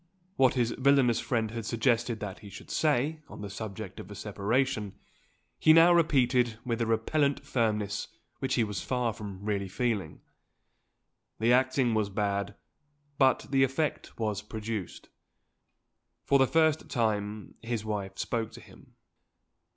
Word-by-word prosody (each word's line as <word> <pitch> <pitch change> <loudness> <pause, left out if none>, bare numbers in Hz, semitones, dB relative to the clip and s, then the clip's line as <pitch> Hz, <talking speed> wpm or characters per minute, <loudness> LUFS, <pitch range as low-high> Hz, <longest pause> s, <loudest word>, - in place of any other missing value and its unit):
What 130 -4 +4
his 120 -2 +1
villainous 135 -3 +4
friend 115 -4 -1
had 115 0 -4
suggested 115 0 0
that 100 -2 -5
he 105 - -11
should - - -11
say, 155 +1 +1
on - - -10
the 100 -1 -6
subject 100 -1 -7
of - - -9
a 105 - -8
separation, 105 +2 -1 0.6
he 155 - +6
now 165 +2 +7
repeated 125 -8 +3
with 120 -1 -1
a 115 - +1
repellent 140 +6 +1
firmness 105 -5 -1 0.3
which 135 - 0
he 120 - +3
was 105 -2 -3
far 125 -3 -1
from 100 -2 -8
really 100 -2 -1
feeling. 100 -5 -2 1.2
The 115 +3 +4
acting 130 -1 +2
was 110 -2 +1
bad, 100 0 -2 0.6
but 130 -1 +4
the 135 -1 +3
effect 135 +4 -2
was 105 -3 -2
produced. 110 -2 -6 1.2
For 140 - +4
the 135 - +5
first 160 +1 +2
time, 105 -3 -1
his 115 -2 -3
wife 100 -3 -4
spoke 115 -2 -2
to - - -10
him. - - -18
115 Hz, 145 wpm, -29 LUFS, 105-130 Hz, 1.2 s, now